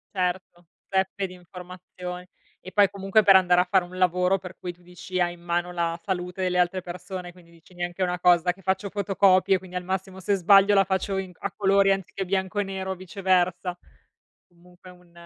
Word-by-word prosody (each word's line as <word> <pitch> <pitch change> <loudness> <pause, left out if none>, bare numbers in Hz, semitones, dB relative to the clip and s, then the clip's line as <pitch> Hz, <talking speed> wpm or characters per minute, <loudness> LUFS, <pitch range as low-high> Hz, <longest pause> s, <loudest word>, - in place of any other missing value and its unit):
Certo, 180 -1 -3 0.2
zeppe 190 0 -1
di 185 - -12
informazioni. 180 0 -10 0.3
E 185 - -10
poi 200 +1 +4
comunque 200 +2 +1
per 195 - +7
andare 180 -1 +4
a - - +2
fare 190 -1 +3
un 180 +1 -11
lavoro 180 +1 +2
per 180 -1 -11
cui 180 -1 -6
tu 175 - -26
dici: 180 +1 -6
“Hai 175 0 +1
in 175 - -16
mano 175 +1 -2
la 170 -1 -2
salute 180 -1 -4
delle 180 -1 0
altre 180 +1 +1
persone”, 180 0 -7
quindi 175 -1 -20
dici: 170 +2 -21
“Neanche 175 +1 -5
una 180 0 -1
cosa 180 0 +4
che 185 +2 -15
faccio 190 +2 -1
fotocopie, 195 -1 +3
quindi 185 0 -13
al 180 - -3
massimo 190 +1 -4
se 200 +2 0
sbaglio 195 +2 +5
la 195 - +6
faccio 190 +1 -2
in 190 -1 -4
a - - -4
colori 195 0 +3
anziché 195 0 -3
bianco 190 +2 -1
e - - +2
nero 190 -1 -5
o - - -3
viceversa”. 185 -1 -1 0.7
Comunque 180 +1 -18
un 180 -1 -20
185 Hz, 200 wpm, -25 LUFS, 180-190 Hz, 0.7 s, per